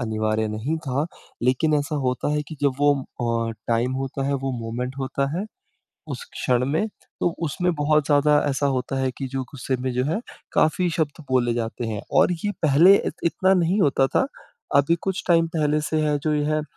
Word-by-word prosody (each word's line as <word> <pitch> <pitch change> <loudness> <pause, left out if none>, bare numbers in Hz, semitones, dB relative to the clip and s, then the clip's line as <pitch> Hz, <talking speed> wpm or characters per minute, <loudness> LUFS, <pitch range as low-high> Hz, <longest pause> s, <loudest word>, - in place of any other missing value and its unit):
अनिवार्य 110 -1 0
नहीं 115 +10 -2
था 135 +4 0 0.4
लेकिन 130 +5 +2
ऐसा 145 +1 -1
होता 125 +3 0
है 150 - 0
कि 155 - -8
जब 140 - +3
वो 145 0 +5 0.6
अ, - - -4 0.2
टाइम 120 +2 +1
होता 135 0 -3
है 140 - +1
वो 135 - -1
मोमेंट 125 +3 -4
होता 135 +1 -1
है। 200 - -2 0.6
उस - - -5
क्षण 125 0 +1
में 160 +9 +1 0.3
तो - - +3 0.2
उसमें 180 +4 0
बहुत 150 0 +2
ज़्यादा 150 0 +4
ऐसा 140 0 0
होता 130 +1 -2
है 130 -1 0
कि 135 - -3
जो 135 0 -3
गुस्से 130 -1 -2
में 130 - -1
जो 125 +1 0
है 165 - -1 0.3
काफ़ी 175 +3 +2
शब्द 155 -1 -2
बोले 120 -2 +2
जाते 115 0 -3
हैं 110 -2 -3 0.2
और - - +4
ये 205 - +1
पहले 160 +6 +7
इत - - -2
इतना 190 +3 +3
नहीं 180 +5 +1
होता 140 -5 +3
था - - +3 0.5
अभी 140 +4 +4
कुछ 190 -1 -2
टाइम 165 -1 +5
पहले 150 0 +2
से 155 - +1
है 150 -1 +2
जो 150 +1 0
ये 150 - +1
है 155 +1 +1
अ, - - -5
140 Hz, 205 wpm, -23 LUFS, 125-155 Hz, 0.6 s, पहले